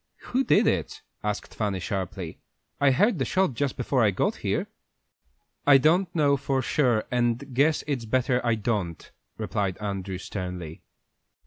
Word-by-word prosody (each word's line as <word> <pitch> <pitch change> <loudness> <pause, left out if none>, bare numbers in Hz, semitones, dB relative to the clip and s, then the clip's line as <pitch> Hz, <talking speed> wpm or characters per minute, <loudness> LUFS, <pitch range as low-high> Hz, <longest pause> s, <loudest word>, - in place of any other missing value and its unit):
"Who 260 +2 +3
did - - +4
it?" 85 -6 -1 0.2
asked 105 -1 -3
Fanny, 100 -4 -1
sharply. 95 -1 -4 0.4
"I 140 - +5
heard 195 - +3
the - - +2
shot 185 +3 +1
just 140 +3 -2
before 125 0 +1
I 105 - +5
got 95 - 0
here." - - -1 1.0
"I 140 -1 +9
don't 170 +7 +3
know 145 -3 +3
for 135 -1 -1
sure, 120 -5 +2
and 120 +2 0
guess 150 +5 +3
it's 135 -6 -2
better 125 +2 +1
I 120 -2 +2
don't," 105 -7 -3 0.3
replied 95 -3 -2
Andrew, 100 -2 -4
sternly. 90 -4 -6
120 Hz, 150 wpm, -26 LUFS, 100-140 Hz, 1.0 s, I